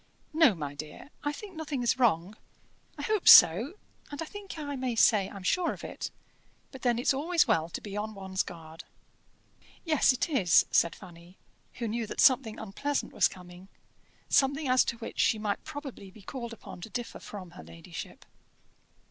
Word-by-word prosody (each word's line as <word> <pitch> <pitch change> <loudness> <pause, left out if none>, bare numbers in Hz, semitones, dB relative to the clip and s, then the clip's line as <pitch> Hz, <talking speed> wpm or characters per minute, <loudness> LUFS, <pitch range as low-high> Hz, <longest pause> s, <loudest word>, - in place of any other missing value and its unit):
"No, 310 - +5
my 145 -4 -5
dear, 155 - -10
I 290 - 0
think 375 +5 -10
nothing 295 -5 -4
is 240 +2 +1
wrong: 205 -4 +2 0.6
I - - -6
hope 430 -4 -1
so, 225 - +8 0.3
and 290 - -8
I 325 - -3
think 405 +1 -9
I 290 -2 -5
may 255 -2 -2
say 210 -3 +4
I'm 195 -2 -10
sure 345 - +1
of - - -12
it; - - -6 0.6
but 265 - -11
then 240 -2 +1
it's 245 - +2
always 325 +5 +1
well 160 +1 +1
to - - -5
be 205 -1 -8
on 215 +1 -4
one's 190 -1 -2
guard." 160 -2 -9 1.0
"Yes, 310 -4 +4
it 255 +4 -1
is," 215 - +4
said 170 - +3
Fanny, 175 -1 -15 0.4
who 235 - -4
knew 225 +1 -3
that - - -7
something 255 -5 +4
unpleasant 270 +8 -3
was - - +4
coming 180 +1 -13 0.6
something 280 +2 +2
as 255 0 +4
to 235 - -3
which 230 - -8
she 220 - +3
might 210 -1 -3
probably 285 -9 -8
be 200 +2 -16
called 235 +2 -6
upon 220 -5 -11
to 225 - -8
differ 240 +2 -6
from 185 -4 -9
her 80 - -12
ladyship. 85 +1 -10
230 Hz, 180 wpm, -29 LUFS, 190-285 Hz, 1.0 s, so